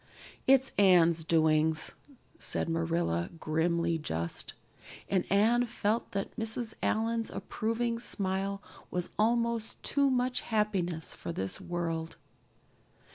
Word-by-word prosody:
"It's 270 0 +5
Anne's 170 -4 +5
doings," 155 -1 +2 0.5
said - - +1
Marilla, 165 - 0
grimly 165 +1 +1
just; 85 - -3 0.5
and 190 -2 0
Anne 230 +5 +4
felt 225 -1 -1
that 195 -1 -3
Mrs. 225 0 -1
Allan's 225 +1 0
approving 230 +1 -2
smile 195 -2 -1 0.3
was 180 -1 -2
almost 230 0 +1
too 280 -1 +2
much 250 -1 +1
happiness 195 -7 -1
for - - -6
this 95 - -3
world. 165 -2 -3
195 Hz, 105 wpm, -30 LUFS, 165-230 Hz, 0.5 s, It's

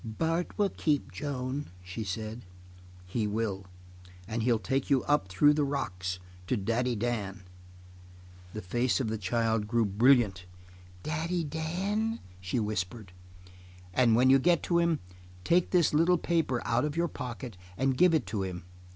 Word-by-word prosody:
"Bart 165 +10 -2
will 205 -3 +2
keep 150 -3 0
Joan," 140 -1 -4
she 95 +5 -5
said. 110 +4 -5 0.6
"He 105 +4 -1
will. 100 -3 -2 0.6
And 110 +2 -2
he'll 115 0 +3
take 130 +8 -1
you 135 -3 +3
up 145 -10 +2
through 120 +11 +4
the 150 0 +1
rocks 95 -10 -2 0.3
to 125 - +1
Daddy 115 +4 0
Dan." 105 -4 -3 1.1
The 110 - -6
face 120 +10 +1
of 125 -5 -1
the 110 0 -2
child 110 +2 0
grew 115 +1 +2
brilliant. 105 -3 +3 0.6
"Daddy 165 +3 -1
Dan?" 190 +9 -2 0.2
she 95 +6 -2
whispered. 105 -1 -3 0.8
"And 115 +1 +4
when 130 +3 +5
you 135 - +7
get 170 +4 +3
to 170 -1 +2
him, 170 -2 +1 0.4
take 170 - +3
this 175 -6 +3
little 170 +4 +4
paper 160 -7 0
out 115 +1 +2
of 150 +1 -2
your 170 0 +2
pocket 125 - -6 0.2
and 135 +1 +1
give 175 +4 +5
it 150 - +1
to 105 -3 -3
him. 90 -2 -4
125 Hz, 155 wpm, -29 LUFS, 105-150 Hz, 1.1 s, you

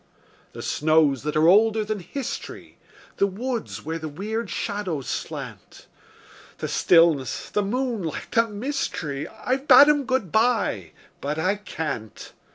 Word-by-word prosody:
The - - -8
snows 150 -4 +2
that 150 +1 -3
are 155 +1 +4
older 215 +3 +4
than 215 -1 -3
history, 260 +8 -7 0.4
The 200 - +3
woods 230 - -4
where 165 +1 -3
the 155 -1 -5
weird 210 +7 -4
shadows 185 -9 -3
slant; - - -6 0.7
The - - -4
stillness, 165 -7 +3
the 210 - +1
moonlight, 220 - -3
the 230 -1 +3
mystery, 205 - -3
I've 255 +5 -3
bade 280 +2 +9
'em 290 -2 +2
good 255 -10 -1
by 220 - +1 0.3
but 145 +2 -3
I 185 +5 +1
can't. 150 - -6
200 Hz, 135 wpm, -24 LUFS, 155-230 Hz, 0.7 s, bade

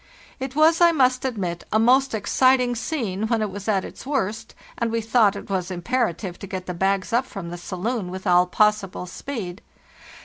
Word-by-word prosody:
"It 265 0 -5
was, 320 +2 +4
I 340 0 +7
must 260 -4 +2
admit, 185 -9 -3
a 215 - +3
most 255 +3 +4
exciting 250 +3 +3
scene 225 - -2
when 225 -1 +1
it 210 - -3
was 200 +1 -8
at 195 -3 +1
its - - -10
worst, 225 -5 -3 0.2
and 235 -1 0
we 230 - 0
thought 220 -2 +3
it 200 - -8
was 185 -2 -2
imperative 185 0 -2
to 200 - -8
get 185 -2 -5
the 180 - -4
bags 195 +3 0
up 245 +3 +2
from 175 -4 -7
the - - -5
saloon 190 +3 -3
with 185 +2 -7
all 180 -1 +4
possible 210 -2 +1
speed. 195 -1 -6
215 Hz, 195 wpm, -23 LUFS, 185-250 Hz, 0.2 s, I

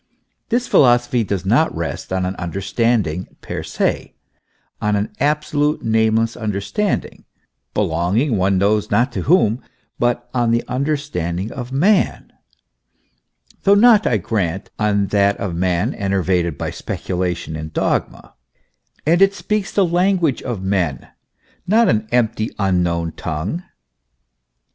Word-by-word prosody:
This 240 +1 0
philosophy 120 -2 +4
does 100 -4 -3
not - - +2
rest - - -4
on 95 -1 0
an 95 +1 -3
Understanding 100 0 -1
per - - -5
se, - - -2 0.7
on 105 0 +1
an 105 +1 -1
absolute, 150 +1 0
nameless 110 +1 +2
understanding, 110 - -2 0.5
belonging 95 - +1
one 95 0 +2
knows 105 +2 +1
not 125 +3 +2
to - - -3
whom, 130 - +3 0.4
but 120 0 0
on 120 -2 +1
the 115 0 +2
understanding 125 - -2
of 125 -2 -7
man; 185 +9 +1 1.3
though 200 +1 +5
not, 220 0 +6
I 115 - +2
grant, 95 -2 -2
on 105 -2 +2
that 100 0 +2
of 95 -4 -3
man 90 0 0
enervated 90 -5 0
by - - -3
speculation 90 -3 -3
and 80 0 -6
dogma; - - -2 0.7
and 170 +4 +3
it 195 0 +5
speaks 210 -1 -2
the 200 - +3
language 175 -4 +1
of 110 -6 -4
men, 90 -9 -1 0.6
not 225 +5 +4
an 110 -1 +1
empty, 115 -2 +1
unknown 90 -4 0
tongue. 80 - -4
110 Hz, 125 wpm, -19 LUFS, 95-140 Hz, 1.3 s, not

